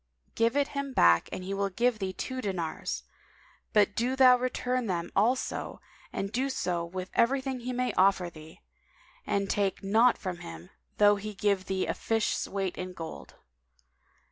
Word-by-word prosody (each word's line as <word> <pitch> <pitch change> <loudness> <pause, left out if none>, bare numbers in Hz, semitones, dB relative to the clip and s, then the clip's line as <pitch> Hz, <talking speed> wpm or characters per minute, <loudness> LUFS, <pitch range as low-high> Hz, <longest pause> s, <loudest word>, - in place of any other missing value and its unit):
Give 230 +4 +2
it 285 0 +2
him 280 -1 -4
back 85 - +5
and 185 - -5
he 195 +2 -4
will 200 0 0
give 235 +3 +1
thee 190 -2 -2
two 260 +7 -5
dinars; 180 -7 -3 0.7
but 210 -1 +3
do 250 +3 0
thou 255 -1 +7
return 250 -1 -1
them 175 -2 -2
also 240 +6 0 0.3
and 195 +2 -3 0.2
so 175 -8 -2
do 180 - -17
with 185 0 -5
everything 265 +1 +1
he 245 +1 -4
may 250 0 -1
offer 190 -1 +3
thee; 160 -1 -13 0.7
and 200 0 0
take 200 0 0
naught 225 +5 +4
from 185 -2 -4
him, 85 - -10 0.3
though 205 0 +6
he 210 +1 -6
give 200 -2 +1
thee 190 0 -1
the - - -1
fish's 225 -1 -1
weight 195 -2 -3
in 185 0 -5
gold. 165 -2 -8
200 Hz, 170 wpm, -29 LUFS, 185-245 Hz, 0.7 s, thou